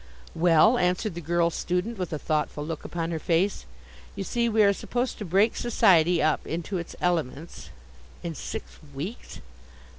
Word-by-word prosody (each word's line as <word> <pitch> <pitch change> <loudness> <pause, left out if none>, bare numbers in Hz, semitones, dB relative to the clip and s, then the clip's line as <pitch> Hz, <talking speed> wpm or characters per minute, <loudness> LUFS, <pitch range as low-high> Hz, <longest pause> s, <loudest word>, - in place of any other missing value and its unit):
"Well," 175 +8 +5
answered 180 +3 0
the 170 - -6
girl 170 +1 +1
student 180 +7 -2
with 180 - -3
a 155 - -2
thoughtful 150 -1 -2
look 160 -1 -5
upon 165 -1 -3
her 160 - -2
face, 175 - 0 0.5
"you 195 - -3
see, 235 +3 0
we 220 -1 +4
are 200 0 +5
supposed 245 +5 -3
to 210 - -4
break 195 +6 +3
society 175 -7 +3
up 155 -1 +1
into 175 +3 -3
its 170 - -7
elements." 165 -3 -2 0.5
"In 170 - -3
six - - -7 0.2
weeks?" 180 - -7
175 Hz, 160 wpm, -26 LUFS, 165-200 Hz, 0.5 s, Well